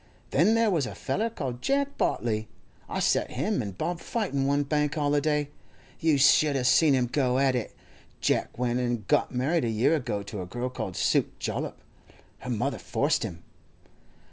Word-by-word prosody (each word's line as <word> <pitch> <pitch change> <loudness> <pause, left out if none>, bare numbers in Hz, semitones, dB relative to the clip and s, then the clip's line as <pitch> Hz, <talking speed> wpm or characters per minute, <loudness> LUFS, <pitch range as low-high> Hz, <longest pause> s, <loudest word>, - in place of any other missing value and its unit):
Then 220 - +4
there 230 -2 +3
was 155 -8 +1
a 100 - -7
feller 205 - -1
called 130 - -5
Jeck 280 +1 0
Bartley. 110 -2 -1 0.4
I - - -3
set - - +2
him - - 0
an' 100 -2 -5
Bob 170 - -3
fightin' 170 - -1
one 140 +1 +2
Bank 150 0 0
holiday—you 145 +1 -1
should 145 +1 +5
a' 130 - 0
seen 140 +3 +5
'em 125 -1 +2
go 125 0 +1
at 135 -1 +3
it! 125 -3 -3 0.4
Jack - - 0
went 125 0 0
an' 120 -4 -1
got - - +2
married 140 +7 0
a 115 - 0
year 115 +8 +2
ago 105 -8 -2
to 100 -1 -6
a 90 - -6
girl 120 +6 -3
called 95 -7 -5
Suke - - +1
Jollop; - - -3 0.6
her 125 - -7
mother 125 +3 -1
forced 145 +3 0
him. 90 -6 -5
135 Hz, 175 wpm, -27 LUFS, 120-150 Hz, 0.6 s, should